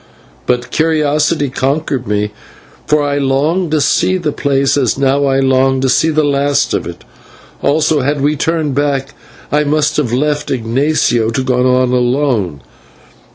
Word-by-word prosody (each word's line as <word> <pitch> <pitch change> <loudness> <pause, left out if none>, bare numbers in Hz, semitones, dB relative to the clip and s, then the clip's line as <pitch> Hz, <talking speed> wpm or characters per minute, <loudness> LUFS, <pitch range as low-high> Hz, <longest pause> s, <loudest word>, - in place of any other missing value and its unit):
But 125 0 -1
curiosity 155 -2 +1
conquered 135 -1 -2
me, 105 0 -1 0.6
for 150 0 +2
I 145 0 -1
longed 150 +6 0
to 155 0 +1
see 185 +6 +1
the 160 -5 -2
place, 140 -1 0
as 130 -5 0
now 140 +1 +1
I 135 -1 +1
long 135 0 +2
to 135 - +1
see 160 +5 +2
the 155 -1 +1
last 140 0 +1
of - - -2
it; - - -9 0.6
also, 155 +1 +1
had 145 +3 -1
we 145 +2 +1
turned 160 -1 -1
back, 140 -1 -1 0.4
I 150 +1 +2
must 150 0 0
have 140 -7 0
left 145 +3 -1
Ignatio 120 -1 0
to 130 +3 -2
go 125 0 +2
on 130 -1 +1
alone. 125 - 0
140 Hz, 155 wpm, -14 LUFS, 130-150 Hz, 0.6 s, for